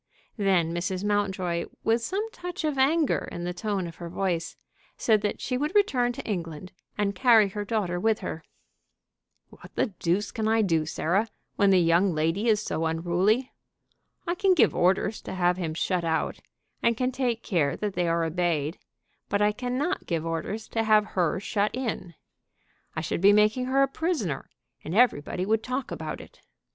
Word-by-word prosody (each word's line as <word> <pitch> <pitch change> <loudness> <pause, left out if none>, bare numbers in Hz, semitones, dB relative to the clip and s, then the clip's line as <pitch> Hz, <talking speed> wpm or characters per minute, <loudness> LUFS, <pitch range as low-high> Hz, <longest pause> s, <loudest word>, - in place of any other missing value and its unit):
Then 185 -5 +2
Mrs. 180 +2 -2
Mountjoy, 190 -4 0 0.2
with 225 +1 +2
some 395 - -2
touch 355 -4 -6
of 300 -3 -1
anger 300 +3 +2
in 175 - -5
the 180 0 -2
tone 200 0 -2
of 165 -1 -8
her 170 -1 -7
voice, 175 -2 -2 0.4
said 215 -3 +3
that 205 - -2
she 250 0 -2
would 300 +7 -2
return 260 -13 +3
to - - -7
England, 175 -3 -4 0.3
and 205 -1 0
carry 225 -4 +5
her 205 +2 -4
daughter 200 -5 -1
with 220 +2 +1
her. 160 - -5 1.1
"What - - -15
the 220 - 0
deuce 180 +5 0
can 220 -1 -2
I 225 0 +3
do, 165 -5 +1
Sarah, 195 +8 0 0.3
when 200 - +4
the 190 -1 +5
young 170 +1 +3
lady 165 +8 0
is 215 -2 +3
so 160 -4 -1
unruly? 180 +10 +1 0.7
I 345 - 0
can 375 +1 +3
give - - +4
orders 190 +4 +1
to - - -6
have 180 -1 +2
him 165 -4 -3
shut 180 +1 0
out, 160 -1 -1 0.4
and 235 -1 +2
can 255 +1 0
take 245 -3 -1
care 155 -7 0
that 210 -2 -3
they 175 -1 0
are 165 0 +1
obeyed; 165 -2 -1 0.5
but 200 - +1
I 210 0 +4
cannot 255 - -2
give 165 -2 -1
orders 165 +7 -3
to 225 - 0
have 215 -1 +4
her 180 -1 +1
shut 205 +1 -1
in. 225 -9 -4 0.8
I 155 - -1
should 165 - -2
be 200 +2 +7
making 215 +4 +3
her 270 +2 +3
a - - +3
prisoner, 270 - -2 0.3
and 160 - -4
everybody 185 -6 +2
would 220 +2 +1
talk 255 +3 -4
about - - -5
it. - - -16
200 Hz, 180 wpm, -27 LUFS, 175-230 Hz, 1.1 s, be